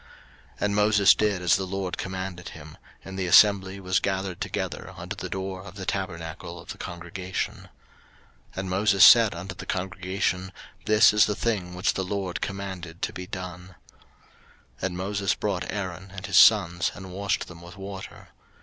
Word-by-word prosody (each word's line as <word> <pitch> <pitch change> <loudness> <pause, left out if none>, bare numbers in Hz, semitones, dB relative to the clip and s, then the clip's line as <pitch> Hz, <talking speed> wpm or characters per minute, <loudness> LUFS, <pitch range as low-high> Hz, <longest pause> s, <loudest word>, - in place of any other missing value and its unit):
03:008:004 - - -30
And 100 0 0
Moses 105 -1 +6
did 105 -4 0
as 90 - +5
the 95 -1 -3
LORD 95 -1 -3
commanded 95 -1 -5
him; 80 -1 -11 0.3
and 95 0 -7
the 95 - -1
assembly 100 +1 +5
was 95 0 +1
gathered 95 -2 -2
together - - -4
unto - - -6
the - - -6
door 95 -1 -4
of 100 -1 -11
the 95 -2 -6
tabernacle 85 -3 -4
of - - -14
the - - -7
congregation. 90 +2 -4
03:008:005 - - -15 0.9
And 95 0 -4
Moses 100 +1 +5
said 115 -5 +7
unto 95 +4 -6
the - - -10
congregation, 95 0 -2 0.3
This 110 0 +6
is 105 - +5
the 105 - -1
thing 95 -7 -2
which 90 - +1
the 95 - -2
LORD 95 -1 -3
commanded 95 -4 -6
to - - -1
be 90 -1 -7
done. 90 -1 -8 1.0
03:008:006 - - -17
And 90 -1 -6
Moses 100 +1 -1
brought 100 -4 -2
Aaron 95 -1 -5
and 95 - -6
his - - +1
sons, 95 -3 +5
and 95 -1 -9
washed 100 0 -1
them 85 -1 -12
with 85 +1 -12
water. 95 0 -9
95 Hz, 175 wpm, -26 LUFS, 90-100 Hz, 1.0 s, said